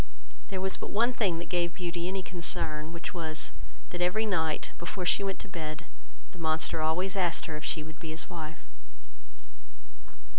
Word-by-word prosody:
There 190 -2 -2
was 190 0 +1
but - - -4
one 235 +4 +4
thing 195 -8 +3
that 170 - -4
gave 175 -1 +2
Beauty 175 -1 -1
any 190 0 -1
concern, 160 -3 -1
which 170 +4 -4
was, 160 -3 -2 0.4
that 175 - -2
every 190 +5 +4
night, 160 -7 +1
before 180 +2 -2
she 200 - +5
went 195 -1 0
to - - -7
bed, 155 -4 -4 0.5
the 180 - -12
monster 160 0 +2
always 180 +5 +2
asked 175 -4 +2
her, 155 - -3
if 150 - -5
she 155 - +1
would 155 0 -9
be 165 - -5
his 160 +1 0
wife. 160 -2 -6
170 Hz, 180 wpm, -31 LUFS, 160-185 Hz, 0.5 s, she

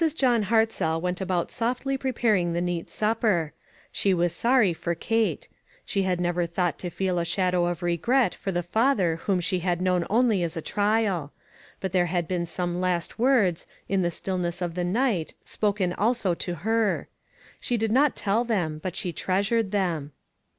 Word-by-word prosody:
John 245 -7 +2
Hartzell 220 -7 +1
went 180 +2 -2
about 185 -2 -1
softly 250 +4 -1
pre 265 0 -2
paring 205 -8 +1
the 170 - 0
neat 175 -1 -2
supper. 210 -7 0 0.4
She 195 -2 +1
was 175 -1 +1
sorry 235 -2 +3
for 170 +1 -3
Kate. 225 +5 0 0.4
She 195 - 0
had 185 -2 0
never 175 0 0
thought 175 +1 -1
to 180 - -4
feel 180 0 -1
a - - 0
shadow 180 0 +1
of 175 0 -3
regret 225 +10 +2
for 195 - -4
the 175 -1 -1
father 190 -3 +2
whom 185 +2 0
she 180 +1 0
had 175 -1 -1
known 180 -1 +1
only 225 -3 +3
as 170 0 -2
a - - 0
trial. 205 -7 0 0.5
But 190 - -3
there 180 -1 +2
had 175 -1 -1
been 175 -2 -2
some 175 +1 -2
last 180 +2 -1
words, 225 -9 +2 0.2
in 195 -1 +1
the 175 - +1
stillness 175 0 -2
of 175 -2 -3
the 180 +1 -2
night, 195 -2 0
spoken 200 -4 -1
also 215 -3 +1
to 175 +1 -3
her. 220 +5 0 0.5
She 240 - -1
did 220 -1 0
not 275 +4 +3
tell 210 +3 +1
them, 175 -10 -1
but 185 0 -4
she 175 - -3
treasured 200 +6 0
them. 170 -8 -1
185 Hz, 180 wpm, -26 LUFS, 175-220 Hz, 0.5 s, sorry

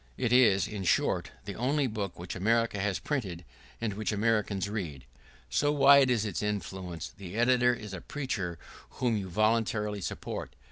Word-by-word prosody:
It 120 - +1
is, 110 -6 +5
in 105 -2 -5
short, 90 - +1 0.2
the 100 - -5
only 140 +7 +1
book 105 -6 -3
which 85 +1 -6
America 115 +2 +1
has 100 -1 0
printed 95 - -3 0.3
and 115 -3 -2
which 105 +2 -2
America 105 -1 +1
reads. 85 -11 -5 0.5
So 145 - +2
wide 140 -2 +6
is 115 -4 +2
its 100 -5 -3
influence. 95 -5 -4
The 95 -1 -9
editor 125 +1 +4
is 105 -3 -8
a 95 - -6
preacher 100 - -3 0.4
whom 120 -3 0
you 100 -3 -3
voluntarily 105 0 +1
support. 70 -6 -5
105 Hz, 160 wpm, -30 LUFS, 95-120 Hz, 0.5 s, wide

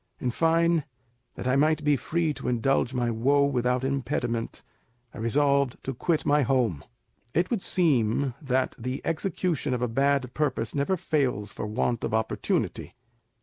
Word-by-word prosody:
In 125 - -1
fine, 165 +2 +2 0.5
that - - -5
I 130 - +2
might 155 +2 +2
be 145 0 +4
free 160 +3 -1
to - - -7
indulge 125 +1 +1
my 120 -2 0
woe 140 +5 +3
without 125 -2 0
impediment, 130 -4 -2 0.5
I - - -9
resolved 140 +3 +2
to 135 - -3
quit 155 +6 0
my 145 +1 +4
home. 120 - +1 0.5
It 175 +2 +1
would 225 -5 0
seem 135 - +1
that 130 -2 0
the 125 +3 -4
execution 165 -5 -1
of 125 - -2
a - - +2
bad 135 +1 +1
purpose 130 -7 -1
never 145 +7 0
fails 130 - -1
for - - -5
want 115 +2 -1
of - - -1
opportunity. 110 +1 -1
135 Hz, 155 wpm, -27 LUFS, 120-150 Hz, 0.5 s, be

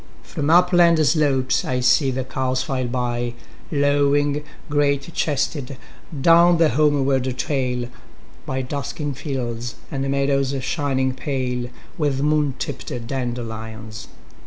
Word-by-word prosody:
1From 145 0 -2
upland 175 -1 +5
slopes 140 -5 +2
I 125 -1 -1
see 135 +3 +4
the 130 0 -2
cows 130 0 -1
file 130 -1 -2
by,2Lowing, 140 +4 0 0.2
great 145 +1 0
chested, 140 -2 -1 0.4
down 170 +3 +6
the 165 -1 +4
homeward 140 -1 +2
trail,3By 130 0 -4
dusking 145 +1 -3
fields 120 -4 -4 0.2
and 135 -1 -2
meadows 140 0 +1
shining 130 -2 0
pale4With 130 +2 -3
moon 150 -2 +1
tipped 130 - -5 0.2
dandelions. 110 -3 -5
135 Hz, 100 wpm, -22 LUFS, 125-145 Hz, 0.4 s, down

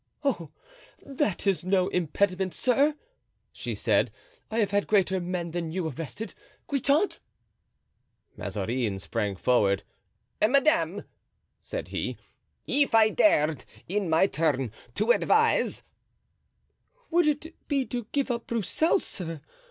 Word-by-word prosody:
"Oh! 190 - -1 0.6
that 275 - -1
is 195 -3 +1
no 185 0 +2
impediment, 185 +2 0
sir," 280 +4 +2 0.6
said - - 0
she; - - -37 0.4
"I 225 - -3
have 205 -3 +2
had 205 0 +1
greater 190 -2 +3
men 175 -1 -3
than 165 -1 -3
you 175 -1 -2
arrested—Guitant!" 275 - -2 1.2
Mazarin 105 +2 -2
sprang 105 0 -2
forward. 100 -3 +2 0.6
"Madame," 280 +8 +3 0.6
said - - -6
he, - - -3 0.5
"if 285 -4 +2
I 220 -1 +6
dared 155 - +3 0.2
in 195 -1 -1
my 160 +4 +5
turn 145 - 0 0.3
advise——" 225 +3 +3 1.3
"Would 340 -1 +4
it 305 +3 -3
be 275 -3 +1
to 240 -4 -4
give 280 -2 0
up 235 -1 -3
Broussel, 235 - +2
sir? 165 - -5
195 Hz, 115 wpm, -27 LUFS, 160-270 Hz, 1.3 s, I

